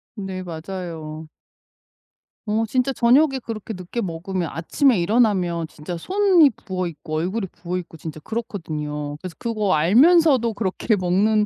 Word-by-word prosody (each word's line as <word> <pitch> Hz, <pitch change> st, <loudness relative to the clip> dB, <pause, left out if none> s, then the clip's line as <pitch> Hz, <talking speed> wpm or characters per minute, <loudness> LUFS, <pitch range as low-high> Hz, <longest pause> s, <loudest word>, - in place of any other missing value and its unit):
네. 190 Hz, -2 st, -5 dB
맞아요. 160 Hz, -2 st, -6 dB, 1.2 s
어 220 Hz, +1 st, +1 dB
진짜 255 Hz, +4 st, 0 dB
저녁에 265 Hz, +3 st, +4 dB
그렇게 225 Hz, -2 st, -6 dB
늦게 185 Hz, +5 st, -6 dB
먹으면 175 Hz, 0 st, -3 dB
아침에 225 Hz, -, +2 dB
일어나면 180 Hz, -5 st, +2 dB
진짜 165 Hz, +3 st, -7 dB
손이 370 Hz, -, +4 dB
부어있고 175 Hz, -6 st, -5 dB
얼굴이 190 Hz, +5 st, -1 dB
부어있고 175 Hz, -1 st, -6 dB
진짜 155 Hz, 0 st, -8 dB
그렇거든요. 150 Hz, -, -4 dB
그래서 180 Hz, 0 st, -8 dB
그거 215 Hz, -4 st, 0 dB
알면서도 250 Hz, -, +5 dB
그렇게 205 Hz, +2 st, 0 dB
먹는 205 Hz, +4 st, +2 dB
190 Hz, 320 characters per minute, -22 LUFS, 165-230 Hz, 1.2 s, 알면서도